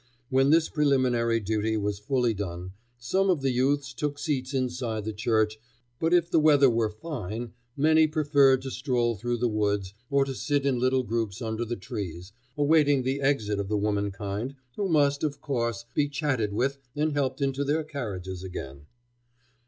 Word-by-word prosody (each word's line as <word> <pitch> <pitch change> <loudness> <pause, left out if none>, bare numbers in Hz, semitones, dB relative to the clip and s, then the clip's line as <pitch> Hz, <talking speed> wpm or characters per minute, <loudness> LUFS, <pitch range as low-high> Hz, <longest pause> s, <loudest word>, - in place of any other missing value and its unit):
When 135 +1 +4
this 160 +1 +4
preliminary 130 -6 +2
duty 110 +1 -1
was 105 -1 -2
fully 120 +1 +1
done, 90 -3 -5 0.3
some 190 +12 0
of 175 -6 +2
the 135 - +2
youths 135 +2 +1
took 145 -1 -3
seats 135 -4 -2
inside 125 -5 -2
the 110 - -3
church, 110 0 +1 0.4
but 165 +1 +1
if 175 -1 +3
the 165 - +4
weather 145 -4 +5
were 115 -1 +1
fine 115 - -6 0.2
many 155 +2 +5
preferred 145 -4 +3
to 135 - -5
stroll 125 -3 0
through 120 +3 -2
the 120 +1 +1
woods, 105 -3 -1 0.2
or 140 -1 +3
to 135 - -4
sit 145 +1 -1
in 130 -3 +1
little 130 +1 +2
groups 115 -3 -2
under 115 -1 -3
the 120 +1 -3
trees, 90 -2 -6 0.3
awaiting 145 -2 +4
the 135 +2 -1
exit 110 -7 +1
of 100 - -2
the 105 - +1
womankind, 100 +3 -2 0.2
who 200 -2 -1
must, 145 -3 +2
of 145 -2 -1
course, 115 -5 -2
be 145 -1 +1
chatted 135 -7 -1
with 135 +6 -1 0.2
and 150 +1 0
helped 135 -2 -1
into 140 0 0
their 150 +3 0
carriages 100 - -5
again. 70 -6 -8
125 Hz, 175 wpm, -27 LUFS, 110-145 Hz, 0.4 s, weather